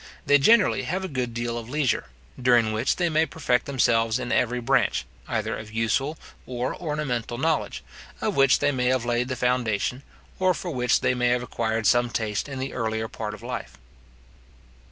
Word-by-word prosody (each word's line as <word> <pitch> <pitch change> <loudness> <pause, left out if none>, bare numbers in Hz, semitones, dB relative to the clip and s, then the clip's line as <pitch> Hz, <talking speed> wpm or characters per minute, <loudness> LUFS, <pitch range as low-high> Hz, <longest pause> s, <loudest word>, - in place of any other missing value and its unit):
They 145 0 +5
generally 215 +8 +5
have 190 +1 -2
a - - -3
good 125 -6 -2
deal 120 0 -3
of 115 0 -10
leisure, 145 -2 0 0.4
during 120 -3 +4
which 110 +4 +1
they 175 - +1
may 160 0 +2
perfect 125 -6 0
themselves 115 -4 +2
in 125 -1 -4
every 125 0 +1
branch, 125 -1 +1 0.2
either - - -1
of 110 -1 -8
useful 115 +7 0 0.3
or 125 0 -2
ornamental 135 -8 -3
knowledge, 160 +3 -1 0.4
of - - -1
which 135 -1 +5
they 145 0 +2
may 125 -3 -1
have 130 -2 +1
laid 120 +1 0
the 130 - -3
foundation, 125 -1 0 0.4
or 185 -1 +3
for 175 - -5
which 125 -3 +1
they - - +2
may 125 -1 +1
have 120 0 +1
acquired 115 -2 -2
some 120 +1 +4
taste 110 +2 -2
in 135 - -5
the 130 +1 -4
earlier 110 -2 -2
part 105 -1 -5
of 105 - -15
life. - - -6
125 Hz, 185 wpm, -25 LUFS, 115-140 Hz, 0.4 s, They